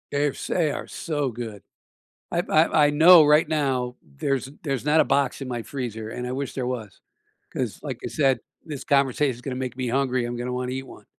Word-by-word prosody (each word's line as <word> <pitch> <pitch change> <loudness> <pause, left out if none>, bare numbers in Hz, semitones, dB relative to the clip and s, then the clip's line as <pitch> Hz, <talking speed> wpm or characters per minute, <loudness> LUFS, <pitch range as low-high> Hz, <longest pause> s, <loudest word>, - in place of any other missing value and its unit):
Yes, 145 -1 -1
they 160 -5 +1
are - - -5
so 145 -4 -2
good. 110 -3 -7 0.7
I 170 - +1
I 155 -1 +4
I - - +2
know 160 +2 +8
right 150 +1 +5
now 130 -5 0
there's 130 - -2
there's 135 -5 -2
not 150 +2 +4
a - - +5
box 140 -1 +1
in 135 - -5
my 120 -2 -3
freezer, 110 -4 -5
and 125 +2 -5
I - - -3
wish 135 +1 -4
there 130 -2 -2
was, 120 -5 -5 0.5
'cause - - -3
like - - -5
I - - -2
said, 135 -5 +2 0.2
this 145 -4 -6
conversation 140 -1 +2
is 120 - -13
gonna 130 0 -4
make 130 -1 -4
me 130 -1 -2
hungry, 130 0 +1
I'm 120 0 -3
gonna 120 +1 -3
wanna 125 0 -2
eat 130 +1 -3
one. - - -13
130 Hz, 215 wpm, -24 LUFS, 125-145 Hz, 0.7 s, know